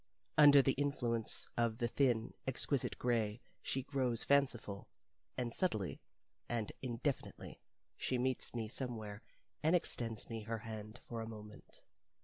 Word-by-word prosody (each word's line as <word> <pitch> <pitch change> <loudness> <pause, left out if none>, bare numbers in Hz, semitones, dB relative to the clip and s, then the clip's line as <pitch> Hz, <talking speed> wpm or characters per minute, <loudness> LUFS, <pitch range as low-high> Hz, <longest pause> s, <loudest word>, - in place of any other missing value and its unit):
Under 145 -2 +9
the 135 - +4
influence 125 -5 -1
of 115 -2 +2
the 120 -1 +1
thin, 120 -2 +2
exquisite 135 +1 0
gray 115 -3 +1 0.2
she 135 - -1
grows 130 -4 0
fanciful, 125 -8 +2 0.5
and 120 -2 -1
subtly 110 - 0 0.5
and 115 -3 -1
indefinitely 130 +2 -3 0.4
she 130 - 0
meets 130 0 0
me 115 -2 -1
somewhere, 110 -4 -3 0.4
and 160 +3 +4
extends 115 -9 0
me 115 -1 -4
her 115 +2 -2
hand 110 -1 -7
for 115 -1 -3
a 110 - -4
moment. 105 -1 -11
120 Hz, 130 wpm, -37 LUFS, 110-130 Hz, 0.5 s, Under